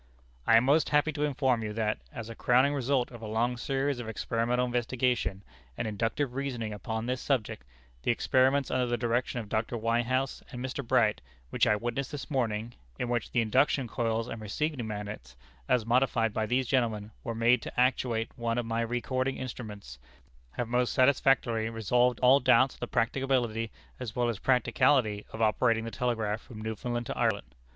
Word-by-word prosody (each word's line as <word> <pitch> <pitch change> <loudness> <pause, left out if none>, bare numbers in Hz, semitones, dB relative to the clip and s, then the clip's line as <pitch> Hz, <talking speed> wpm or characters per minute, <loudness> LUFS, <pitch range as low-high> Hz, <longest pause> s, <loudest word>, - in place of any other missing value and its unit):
"I 115 - +7
am 115 - +4
most 145 +5 +3
happy 150 +1 +3
to 145 -1 -5
inform 130 -4 +1
you 105 -1 -4
that, 105 -6 -1
as 115 -2 -7
a 115 - -7
crowning 130 +5 +3
result 135 -2 0
of 120 -2 -10
a 110 - -6
long 115 +3 0
series 135 +1 -1
of 115 -2 -5
experimental 120 +2 0
investigation 120 -5 -1 0.3
and - - -2
inductive 115 +5 -1
reasoning 125 -5 -3
upon 110 +3 -4
this 125 0 -2
subject, 120 - -1 0.4
the - - -2
experiments 130 +3 +2
under 125 -1 +1
the 120 0 0
direction 120 +1 -1
of 110 - -10
Dr. 110 +3 -1
Whitehouse 120 +4 0
and 125 - -6
Mr. 130 +2 -4
Bright, 115 -3 +2 0.3
which - - +2
I 105 - +4
witnessed 120 +5 -3
this 145 0 -7
morning 115 -3 -1 0.2
in 120 - -2
which 120 -2 -1
the 120 - +2
induction 130 +3 +2
coils 115 0 -1
and 115 - -6
receiving 125 +3 -2
magnets, 105 - -6 0.3
as 120 -4 +2
modified 115 -2 +2
by 110 0 -1
these 130 +2 +1
gentlemen, 115 -5 0
were 115 - -4
made 115 +2 +3
to - - -5
actuate 125 -3 +1
one 115 -1 -2
of 120 - -1
my 115 0 -1
recording 130 +3 -1
instruments 105 - -7 0.5
have 120 - -3
most 125 +1 +1
satisfactorily 130 -4 +3
resolved 120 +2 +1
all 130 +2 +6
doubts 130 0 +4
of - - -18
the 120 - -3
practicability 120 -2 0 0.3
as 120 -4 -6
well 120 -1 +1
as 110 -4 -3
practicality 125 -3 +2
of 110 - -2
operating 115 +1 +2
the 115 - -5
telegraph 110 -2 -1
from 110 -4 -11
Newfoundland 120 +2 -3
to - - -4
Ireland. 105 - -1
120 Hz, 180 wpm, -29 LUFS, 110-130 Hz, 0.5 s, I